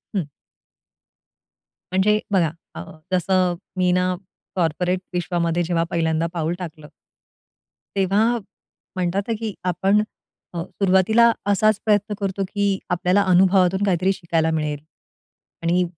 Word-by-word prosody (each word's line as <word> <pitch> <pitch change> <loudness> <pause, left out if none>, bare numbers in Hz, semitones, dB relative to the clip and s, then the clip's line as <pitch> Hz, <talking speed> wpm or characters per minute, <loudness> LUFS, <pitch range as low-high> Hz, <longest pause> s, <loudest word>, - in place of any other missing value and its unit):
हं. 185 - +1 1.7
म्हणजे 210 +3 +3
बघा, 170 -6 +2 0.2
अ, - - -5 0.3
जसं 185 0 +2 0.2
मी 180 -1 +3
ना, 180 0 0 0.4
कॉर्पोरेट 180 +2 0
विश्वामध्ये 175 -1 0
जेव्हा 165 0 0
पहिल्यांदा 165 0 +1
पाऊल 165 0 -1
टाकलं 155 -4 -8 1.1
तेव्हा 210 +5 +2 0.6
म्हणतात 185 +2 0
ना, 230 - 0
की 220 -3 -3
आपण 190 +4 +2 0.5
सुरुवातीला 190 +6 +3
अ, 205 -3 -1
असाच 215 +1 +3
प्रयत्न 210 -1 +2
करतो, 195 0 -2
की 200 -1 0
आपल्याला 180 +3 +2
अनुभवातून 190 +1 +4
काहीतरी 190 +1 +2
शिकायला 165 -3 0
मिळेल. 150 -2 -1 0.8
आणि 175 +2 +2
185 Hz, 115 wpm, -22 LUFS, 170-195 Hz, 1.7 s, अनुभवातून